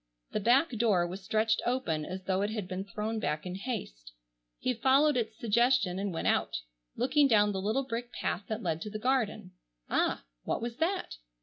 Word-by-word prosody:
The - - 0
back 250 +9 +4
door 210 -7 +2
was 185 +3 -6
stretched 220 +3 +1
open 175 -12 0
as 185 +1 -6
though 190 0 0
it 205 - 0
had 215 -4 -3
been 185 +1 -3
thrown 215 +2 -3
back 150 -6 -2
in 180 - -4
haste. 180 - -5 0.4
He 255 - 0
followed 270 +5 +4
its 225 -3 -1
suggestion 225 -5 +2
and 200 0 -1
went 165 - -3
out, - - +1 0.3
looking 290 +2 +3
down 210 -4 +4
the 190 -1 -2
little 220 +7 +1
brick 240 -1 -4
path 200 -4 -2
that 220 +1 -3
led 165 -2 -1
to 210 - -4
the 215 - -4
garden. 215 -5 0 0.4
Ah! - - +1 0.2
what - - -2
was 235 0 -4
that? 340 - -1
215 Hz, 195 wpm, -30 LUFS, 190-245 Hz, 0.4 s, back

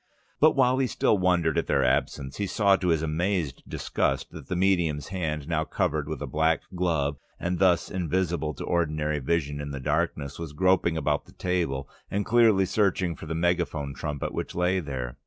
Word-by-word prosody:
But 155 +1 +5
while 130 -1 +3
he 130 - +2
still 105 -2 +2
wondered 90 -4 +2
at - - -3
their 70 - +2
absence, 65 +1 0
he 100 - -1
saw 100 -1 +3
to 95 - -2
his 80 -2 +2
amazed 80 -2 -1
disgust - - -1
that - - -10
the 95 - -2
medium's 85 -5 +1
hand, 80 -6 -3
now 80 -2 0
covered - - -1
with - - -4
a - - -2
black 80 +1 +1
glove, 80 -6 0 0.2
and 90 0 -2
thus 90 -3 +3
invisible 85 -3 -1
to - - -6
ordinary 75 -3 0
human 65 - -7
vision 75 -4 0
in 70 - -5
the 70 -1 -5
darkness, 70 +2 -1
was 80 -3 -6
groping 90 -1 +2
about 75 -2 0
the - - -18
table 85 -7 -1 0.2
and 100 +1 -1
clearly 110 -5 +4
searching 95 -3 +1
for 80 - -10
the 80 - -3
megaphone 80 -4 0
trumpet 75 -1 -4
which - - -4
lay 90 +2 +2
there. 65 -7 -5
85 Hz, 195 wpm, -27 LUFS, 75-95 Hz, 0.2 s, But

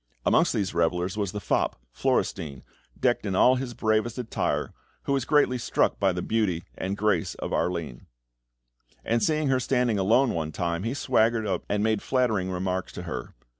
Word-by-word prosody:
Amongst - - +3
these 95 -4 -1
revellers 90 +3 0
was 100 -3 -1
the 105 - -4
fop, 100 - 0 0.2
Florestein, 70 -5 -1 0.4
decked - - +2
in 100 -3 -2
all 130 +6 +5
his 125 -2 -5
bravest 110 +1 0
attire, 125 -3 -2 0.3
who 140 - 0
was 135 -3 0
greatly 145 -4 +3
struck - - 0
with 95 -2 +3
the 90 - -3
beauty 100 -7 0
and 95 +2 -3
grace 105 -6 +1
of - - -5
Arline; 85 -9 -2 1.0
and 115 0 +1
seeing 155 0 +1
her 130 -1 +3
standing 125 -4 +1
alone 115 +6 +3
one 80 -2 -2
time, 85 +2 -2
he 115 +6 -2
swaggered 115 -4 +2
up 100 - -1
and 105 0 +1
made 110 -2 +1
flattering 110 -8 +1
remarks 95 0 -2
to 90 - -6
her. 65 -9 -6
105 Hz, 175 wpm, -26 LUFS, 90-120 Hz, 1.0 s, all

